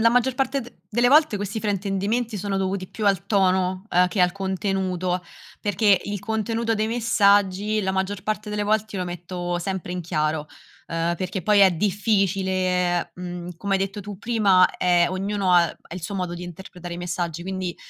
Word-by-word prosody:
la 230 - +6
maggior 250 +1 +2
parte 270 0 0
de 240 0 -11 0.2
delle 240 +3 +3
volte 300 -6 +5
questi 205 +2 -4
fraintendimenti 205 +2 -1
sono 195 0 -2
dovuti 190 0 -1
più 215 - -5
al 195 -1 +2
tono, 185 -1 +2
uhm, 180 +1 +4
che 185 - -1
al 180 0 +3
contenuto, 190 -2 -1 0.4
perché 205 -1 +3
il 205 0 -3
contenuto 225 +2 -1
dei 215 0 0
messaggi, 205 -2 +3
la 190 0 0
maggior 190 +1 -2
parte 215 0 -3
delle 210 0 -1
volte 215 0 0
io 185 - -1
lo 180 - -4
metto 175 0 -4
sempre 185 -1 -4
in 180 - -3
chiaro, 155 -2 -1 0.4
ehm, 165 +1 -1
perché 185 +1 -4
poi 210 -1 +4
è 190 -1 +7
difficile, 185 -2 +1
mhmm, 175 -1 -7
come 200 +2 -1
hai - - +3
detto 195 +2 -3
tu 200 -1 -8
prima 205 -6 +4
è 175 -1 +3
ognuno 195 0 0
ha 175 -1 +6
ha 165 - -10
il 185 - -6
suo 200 +4 -4
modo 180 -2 -2
di 175 - -7
interpretare 175 0 -8
i - - -6
messaggi, 175 -1 -3
quindi 185 -1 -4
190 Hz, 190 wpm, -24 LUFS, 180-210 Hz, 0.4 s, è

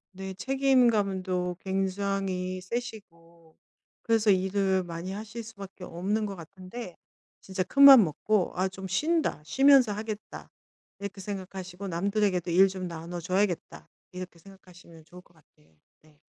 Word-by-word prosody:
네 190 0 -6
책임감도 205 -9 +1
굉장히 190 -1 -2
세시고 170 -7 -8 0.5
그래서 225 -2 +2
일을 190 0 +2
많이 170 +2 -6
하실 220 +3 -7
수밖에 200 -4 -11
없는 205 +6 -2
것 195 - -6
같은데 185 +3 -9 0.5
진짜 190 -1 -3
큰 275 +9 0
마음 270 -6 +11
먹고 185 +4 0
'아 185 +1 +1
좀 190 0 -8
쉰다. 315 - 0
쉬면서 265 - +5
하겠다.' 215 0 -7 0.5
이렇게 200 0 -7
생각하시고 190 -1 -7
'남들에게도 185 0 0
일 190 +3 +6
좀 185 -1 -5
나눠 170 +1 -6
줘야겠다.' 185 +1 -2 0.2
이렇게 180 -1 -8
생각하시면 175 -3 -16
좋을 180 +2 -14
것 175 - -27
같아요. 80 - -29 0.3
네. 150 -2 -25
190 Hz, 300 characters per minute, -28 LUFS, 180-210 Hz, 0.5 s, 마음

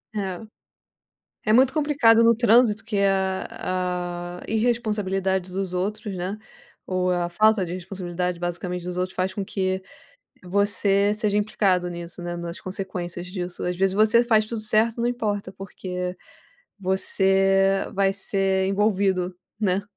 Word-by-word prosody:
É. 190 -4 -3 1.1
É - - +5
muito 255 +3 +5
complicado 280 -7 +4
no 230 0 +6
trânsito, 225 -2 +4
que 210 - -2
a 180 -2 -1
a - - -9
irresponsabilidade 210 -5 0
dos 190 -1 -3
outros, 200 +2 -3
né, 185 +3 -3 0.5
ou 185 0 0
a 175 -1 0
falta 215 +2 +3
de 175 - -6
responsabilidade 180 -1 -4
basicamente 175 0 -3
dos 180 0 -5
outros, 185 +1 -2
faz 185 +1 -1
com 200 - -3
que 190 -1 -1 0.6
você 200 +1 +2
seja 210 -1 0
implicado 190 -4 +1
nisso, 170 0 -8
né, 175 0 -4
nas 170 0 -6
consequências 180 -2 -5
disso, 180 -1 -5
às 180 0 -1
vezes 190 0 +2
você 220 +3 +4
faz 220 -3 +3
tudo 225 -1 -3
certo 220 +2 +2
não 235 - +2
importa, 210 -5 -2
porque 180 -1 -5 0.7
você 195 0 +2
vai 195 0 +3
ser 195 -1 0
envolvido, 195 -3 +1 0.2
né. 195 -2 +1
190 Hz, 140 wpm, -24 LUFS, 180-210 Hz, 1.1 s, no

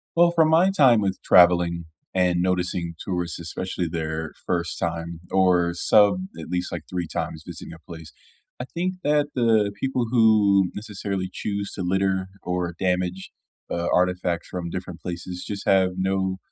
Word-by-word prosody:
Well, 170 0 +5
from 160 -2 +3
my 170 +4 +5
time 130 - +5
with 95 -2 -1
traveling 85 -1 +5 0.3
and 90 -1 +2
noticing 90 -2 -1
tourists, 90 -2 -3
especially 90 +1 -3
their 80 -1 -4
first 85 -1 -1
time 85 0 -4
or 90 -2 +3
sub 105 - +4
at - - -8
least, 90 +1 -2
like, 85 -2 -5
3 90 -2 -3
times 80 0 -4
visiting 85 -1 -8
a 85 - -12
place, 80 -2 -11 0.5
I 125 - -4
think 180 +6 -3
that 145 0 +3
the 110 -4 +3
people 130 -2 -1
who 105 -5 +4
necessarily 100 -3 -4
choose 100 +1 -4
to - - -4
litter 95 +1 0 0.2
or 90 -1 -2
damage, 90 0 -1 0.4
uh, 85 0 -2
artifacts 90 -1 0
from 90 -2 -4
different 90 -1 -6
places 90 0 -6
just 100 -1 -5
have 95 -1 +4
no 95 0 0
90 Hz, 155 wpm, -24 LUFS, 85-100 Hz, 0.5 s, Well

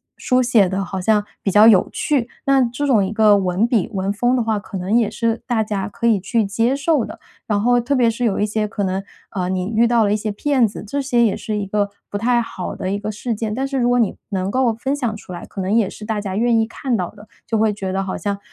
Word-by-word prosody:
书 255 0 +1
写 235 -6 +4
地 190 +1 -1
好 190 +1 -4
像 210 +2 +2 0.2
比 195 - 0
较 210 +3 +7
有 205 -5 +5
趣， 265 -6 0 0.2
那 275 -1 +4
这 250 +4 -2
种 215 -7 +3
一 190 - -4
个 215 -1 +5
文 190 +3 +1
笔、 235 -6 +1
文 195 0 -1
风 245 +4 +1
的 - - +1
话， 220 -1 0
可 200 -1 -6
能 185 +4 -1
也 230 -3 +1
是 230 -1 -1
大 240 -3 0
家 205 -2 -3
可 235 - -2
以 215 -4 +3
去 220 +4 0
接 230 +6 +1
受 285 -1 +1
的， - - -8 0.3
然 210 -2 0
后 245 +1 +3
特 250 +4 -1
别 245 -4 +3
是 230 +2 -3
有 215 -5 +1
一 210 - +2
些 215 0 -1
可 205 -1 -3
能， 190 +1 -2 0.3
呃， 185 -3 -2
你 185 -1 -1
遇 230 +2 +5
到 235 -2 +3
了 205 - +2
一 - - +2
些 215 0 -2
骗 260 +3 +2
子， 210 - -5
这 280 +5 -2
些 245 -3 +2
也 210 - +1
是 215 -1 -3
一 205 -1 -3
个 205 0 0 0.2
不 205 - -3
太 240 +3 +2
好 185 -5 -6
的 185 - -4
一 200 - -1
个 210 +1 -4
事 225 +2 -3
件， 215 0 -3
但 265 +4 -2
是 270 0 -3
如 245 -1 +2
果 245 0 +3
你 220 - +1
能 190 -2 -2
够 250 -1 +2
分 265 +5 -2
享 240 -6 -2
出 205 - -11
来， 175 - -7
可 195 - -7
能 185 - -2
也 220 -3 +3
是 - - -10
大 215 0 -2
家 195 -2 -4
愿 235 +1 +2
意 225 - +2
看 240 +2 -2
到 180 -3 -3
的， 210 0 -16 0.2
就 225 0 -1
会 220 0 +3
觉 195 -2 -4
得 195 +1 -1
好 190 - -4
像， 200 -1 -3
220 Hz, 300 characters per minute, -20 LUFS, 200-240 Hz, 0.3 s, 较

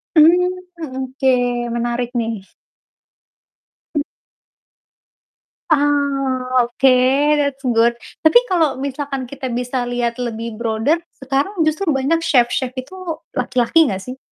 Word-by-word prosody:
Mhm, 345 +3 +6 0.3
mmm, 265 -5 -5
oke, 265 +1 -1 0.4
menarik 240 0 -1
nih. 225 -4 -3 1.5
Mmm. 290 - +2 1.7
Ah, 280 -4 +1 0.2
oke, 245 +3 +1 0.5
that's 280 -2 -1 0.2
good. 235 +1 +3 0.2
Tapi 315 +10 +7
kalau 320 - +1
misalkan 275 -1 -4
kita 265 -1 -6
bisa 250 +1 -2
lihat 245 -1 -2
lebih 230 -2 -4
broader, 225 +6 +1 0.2
sekarang 275 +9 -2
justru 315 +2 0
banyak 290 +5 +1
chef-chef 250 -1 +2
itu 260 +8 -8 0.4
laki-laki 250 +4 +3
gak 190 - -3
sih? 255 +6 -8
260 Hz, 110 wpm, -19 LUFS, 240-290 Hz, 1.7 s, Tapi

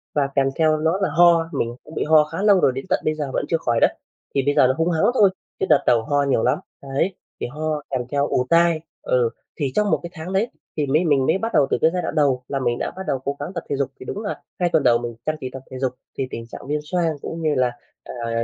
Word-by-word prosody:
và 145 -2 +2
kèm 135 -1 +3
theo 155 -1 +3
đó 160 +5 +1
là - - +2
ho. 170 -1 +5
Mình 120 +1 -1
cũng 155 - -13
bị - - 0
ho 155 0 +6
khá 150 +5 -5
lâu 205 -2 +5
rồi 135 - +4
đến 135 - -5
tận - - +2
bây 155 - +1
giờ 145 -3 -4
vẫn - - 0
chưa 165 - +2
khỏi 120 -7 0
đấy. - - +4 0.4
Thì 135 - +3
bây 145 - +3
giờ 130 - +6
là 130 - +2
húng 165 +1 +1
hắng 160 -1 +1
thôi, 210 -6 +5 0.3
chứ - - +1
đợt - - +5
đầu 120 -2 +5
ho 145 +4 +1
nhiều 135 -5 +1
lắm, 125 - +2 0.2
đấy, 140 +7 -1 0.3
thì - - -1
ho 150 +3 -3
kèm 130 -2 -1
theo 145 0 +1
ù 125 - +1
tai, 170 -1 +4 0.2
ừ. 125 -2 +2 0.3
Thì 140 -4 -1
trong 210 -1 +2
1 - - +3
cái 170 - -5
tháng 170 +3 -6
đấy 205 +5 +1 0.3
thì 150 - +1
mới 155 +6 +2
mình 140 -4 +3
mới 160 - +3
bắt 225 +3 -3
đầu 140 -2 +4
từ - - +2
cái 160 - +5
giai 180 - 0
đoạn - - -4
đầu 135 -4 +2
là 135 - -2
mình 120 -2 0
đã - - -3
bắt 190 - -5
đầu 135 - 0
cố 140 +2 -3
gắng 145 +6 -5
tập 170 - -4
thể - - 0
dục, 135 -1 -1
thì - - -9
đúng 205 - -4
là - - -4 0.2
2 175 -1 +2
tuần 160 -4 +2
đầu 120 -1 +5
mình 120 -1 -5
chăm 155 - 0
chỉ 130 - -4
tập 135 -1 -8
thể 130 - -6
dục 130 -1 0 0.3
thì 135 - -1
tình 115 - -6
trạng 120 - -10
viêm 150 +1 0
xoang 165 0 0
cũng 165 - -5
như 155 -2 +1
là, 125 -1 +2 0.3
à, 115 -1 -3
150 Hz, 295 wpm, -22 LUFS, 130-165 Hz, 0.4 s, ho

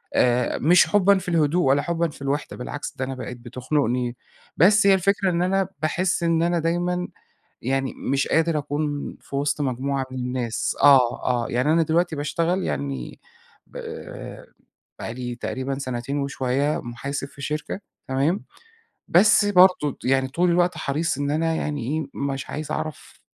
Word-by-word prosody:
آآ 125 0 +2
مش 175 +5 +5
حُبًا 200 -1 +4
في 180 -1 -5
الهدوء 165 +1 +2
ولا 140 +2 +4
حُبًا 170 -1 -1
في 140 - -14
الوحدة، 140 +2 -2
بالعكس 145 +3 -6
ده 130 - -1
أنا 135 0 -5
بقيت 125 -1 -7
بتخنقني. 125 0 -1 0.4
بس 200 +5 +5
هي 195 - +7
الفكرة 195 +1 +2
إن 170 0 0
أنا 190 +1 +1
باحس 175 +2 0
إن 165 0 +2
أنا 170 0 +1
دايمًا 175 +2 -1 0.6
يعني 135 +1 -1
مش 135 +1 -1
قادر 160 -1 +2
أكون 145 0 -3
في 140 - -7
وسط 145 +1 0
مجموعة 135 0 -1
من 130 - -6
الناس 125 -2 -2
آه، 135 -4 +5
آه، 120 -2 0
يعني 125 +6 +2
أنا 165 0 +4
دلوقتي 160 +1 +1
باشتغل 170 +5 0
يعني 70 -3 -4 0.5
ب - - -10 1.2
بقى 115 - -5
لي 125 -1 -5
تقريبًا 130 +2 -3
سنتين 130 +1 -3
وشوية 140 +1 0
محاسب 135 +4 -5
في 140 - -13
شركة 150 +7 -3 0.3
تمام؟ 140 +9 0 0.6
بس 205 +4 +5
برضو 180 -7 +4
يعني 130 0 +2
طول 175 +6 +1
الوقت 175 +1 +2
حريص 150 +1 -1
إن 145 0 -1
أنا 165 +2 +1
يعني 145 -4 -2
إيه، 150 +5 -2
مش 135 -1 -3
عايز 155 0 -5
أعرف 155 -1 -6
145 Hz, 160 wpm, -23 LUFS, 130-170 Hz, 1.2 s, هي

